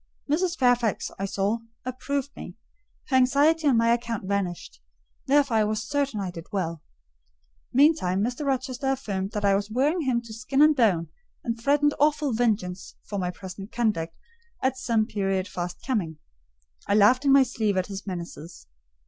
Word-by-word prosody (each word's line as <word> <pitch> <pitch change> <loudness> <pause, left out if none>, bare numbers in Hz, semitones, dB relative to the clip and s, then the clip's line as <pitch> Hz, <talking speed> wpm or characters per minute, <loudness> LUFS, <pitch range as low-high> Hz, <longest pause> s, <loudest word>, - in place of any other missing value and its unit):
Mrs. 335 +4 0
Fairfax, 245 -4 +1
I 195 - -1
saw, 200 +3 -1 0.3
approved 275 +2 -3
me: - - -9 0.5
her 265 - +1
anxiety 290 +5 +3
on 260 -4 +4
my 230 0 +4
account 235 -3 -3
vanished; 175 - -3 0.5
therefore 280 -4 +3
I 215 - +4
was 215 +1 -2
certain 280 -4 -1
I 190 -2 -3
did 165 -1 -10
well. 170 -6 -2 0.9
Meantime, 260 - +3
Mr. 245 +6 -2
Rochester 270 -1 -2
affirmed 210 -7 -2
I 200 -1 +2
was 200 +1 -1
wearing 285 +10 +1
him 255 -5 +1
to 230 -1 -10
skin 255 +5 +2
and 305 0 +5
bone, 190 - +2 0.3
and 230 -1 -3
threatened 290 +3 +3
awful 295 -2 +2
vengeance 205 -6 -1
for 200 -1 -5
my 180 -1 -1
present 190 +2 -9
conduct 205 -9 -1 0.5
at 260 0 +2
some 230 -4 +1
period 195 -2 -1
fast 175 0 -6
coming. 190 - -1 0.7
I 200 - +2
laughed 215 +6 +5
in 280 - +3
my 275 0 +7
sleeve 215 -6 -1
at 185 - +1
his 195 +1 -8
menaces. 170 - -7
230 Hz, 165 wpm, -26 LUFS, 195-270 Hz, 0.9 s, my